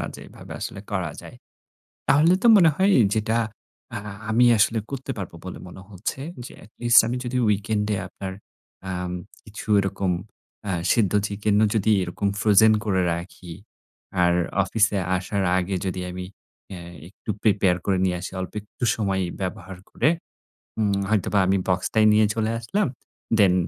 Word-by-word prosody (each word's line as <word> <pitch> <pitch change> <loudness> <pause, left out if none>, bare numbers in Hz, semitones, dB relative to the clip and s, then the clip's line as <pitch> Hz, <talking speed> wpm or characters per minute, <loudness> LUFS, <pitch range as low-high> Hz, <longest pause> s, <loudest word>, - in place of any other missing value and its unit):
না - - -3
যে - - -9
এভাবে - - -12
আসলে 100 - -5
করা 95 -6 -2
যায়। - - -12 0.7
তাহলে 155 +5 +5
তো - - +4
মনে 165 -5 +6
হয় 195 +1 +3 0.2
যেটা 110 +1 0 0.6
আ 115 - -2 0.3
আমি 120 +3 +4
আসলে 110 +2 +3
করতে 135 0 -5
পারব 95 -4 -5
বলে 95 - -7
মনে 95 +1 -11
হচ্ছে, 100 +7 -5 0.3
যে - - -11
এটলিস্ট 120 +2 +4
আমি 120 +2 -2
যদি 125 +1 -3
উইকেন্ডে 105 +1 0
আপনার 95 0 -7 0.6
আম 90 0 -3 0.3
কিছু 110 +2 -10
এরকম 95 -1 -1 0.6
আ - - -1 0.2
সিদ্ধ 105 -6 +2
চিকেন 105 0 -1
ও - - +6
যদি 110 0 +2
এরকম 90 +3 -2
ফ্রোজেন 110 +1 +6
করে 95 -3 +1
রাখি 85 0 -7 0.7
আর 85 0 +4 0.3
অফিসে 105 +1 +1 0.2
আসার 95 +2 -2 0.2
আগে 95 +1 -2
যদি 95 -1 -3
আমি 90 0 -6 0.5
অ্যা 90 -2 -7 0.3
একটু 105 - -8
প্রিপেয়ার 100 -4 +3
করে 95 -2 +1
নিয়ে 90 -1 +1
আসি 90 - -6
অল্প 95 - -5
একটু 105 +4 -7
সময় 95 -3 -1 0.2
ব্যবহার 95 -1 -5
করে। - - +2 0.7
উম 105 -2 +2 0.2
হয়তোবা 105 -1 +1
আমি 95 +1 +3
বক্সটায় 100 +4 +2
নিয়ে 105 0 +5
চলে 110 0 0
আসলাম। 200 - 0 0.5
দেন 95 -3 +6
100 Hz, 155 wpm, -24 LUFS, 95-110 Hz, 0.7 s, মনে